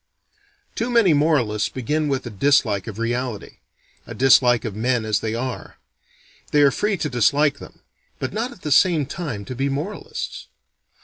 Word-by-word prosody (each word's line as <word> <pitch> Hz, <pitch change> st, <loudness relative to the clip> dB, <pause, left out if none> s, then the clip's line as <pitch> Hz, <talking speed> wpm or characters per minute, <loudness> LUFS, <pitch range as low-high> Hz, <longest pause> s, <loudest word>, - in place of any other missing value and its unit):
Too 235 Hz, +2 st, -2 dB
many 230 Hz, -8 st, +4 dB
moralists 145 Hz, -9 st, +1 dB
begin 150 Hz, +5 st, -2 dB
with 135 Hz, -3 st, -2 dB
a 120 Hz, -, -6 dB
dislike 105 Hz, -3 st, +2 dB
of 110 Hz, -2 st, -7 dB
reality: 120 Hz, -1 st, -3 dB, 0.5 s
a -, -, -8 dB
dislike 125 Hz, -3 st, +4 dB
of 105 Hz, -3 st, -4 dB
men 115 Hz, +1 st, 0 dB
as 105 Hz, -1 st, +1 dB
they 110 Hz, 0 st, -3 dB
are. 125 Hz, +1 st, -5 dB, 0.7 s
They 145 Hz, -1 st, +4 dB
are 140 Hz, -, +5 dB
free 210 Hz, +4 st, -1 dB
to 155 Hz, -, -2 dB
dislike 140 Hz, +3 st, +2 dB
them -, -, -13 dB, 0.4 s
but 130 Hz, -, -4 dB
not 230 Hz, +5 st, -2 dB
at 190 Hz, -, -15 dB
the 150 Hz, -, -3 dB
same 160 Hz, 0 st, +4 dB
time 135 Hz, -, -5 dB
to 130 Hz, -, -6 dB
be 135 Hz, +3 st, -1 dB
moralists. 200 Hz, -, -5 dB
135 Hz, 170 wpm, -22 LUFS, 115-155 Hz, 0.7 s, are